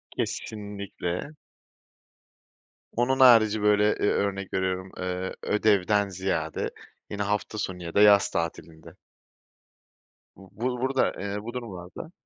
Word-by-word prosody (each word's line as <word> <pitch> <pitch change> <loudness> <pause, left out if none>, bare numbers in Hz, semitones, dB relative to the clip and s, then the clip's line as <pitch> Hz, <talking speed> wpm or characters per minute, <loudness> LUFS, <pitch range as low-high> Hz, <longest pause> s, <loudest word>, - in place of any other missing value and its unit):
Kesinlikle. 100 - -4 1.6
Onun 130 +3 +1
harici, 110 -4 +6
böyle, 105 0 +4 0.2
eee, - - +1
örnek 100 -1 -2
veriyorum, 95 0 -2
eee, 90 0 -3
ödevden 105 -1 +2
ziyade, 85 -4 -2 0.4
yine 100 0 -3
hafta 105 +1 -2
sonu 90 -3 -4
ya 85 - -6
da 100 - +4
yaz 105 -1 +6
tatilinde. 80 -1 -5 1.4
Bu 95 0 -15
bu 125 0 -1
burada, 135 0 +1
eee, 100 0 -3
bu 120 - -6
durumlarda 110 - -8
100 Hz, 115 wpm, -26 LUFS, 95-110 Hz, 1.6 s, harici